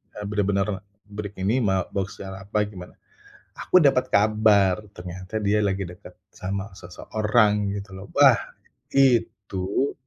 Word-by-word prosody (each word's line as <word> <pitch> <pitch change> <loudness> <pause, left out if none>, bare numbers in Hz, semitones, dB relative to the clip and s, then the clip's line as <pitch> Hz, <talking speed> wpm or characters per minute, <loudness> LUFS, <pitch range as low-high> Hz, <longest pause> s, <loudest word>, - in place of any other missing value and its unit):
e - - -8
benar-benar 100 -1 -1 0.2
break 105 0 -7
ini 105 +7 +1
ma 95 -2 +1
boks 95 -1 -4
secara 95 0 -8
apa, 105 +1 +1
gimana. 90 -4 -11 0.6
Aku 185 - +4
dapat 135 -3 +3
kabar, 105 -2 +3 0.2
ternyata 90 +3 -7
dia 105 +1 +2
lagi 100 0 -1
deket 90 +1 -13 0.2
sama 100 +2 -5
seseorang, 105 +2 0
gitu 100 0 -7
loh. 95 +1 -9
Wah, - - +7 0.6
itu 115 -3 +1
100 Hz, 130 wpm, -24 LUFS, 95-105 Hz, 0.6 s, Wah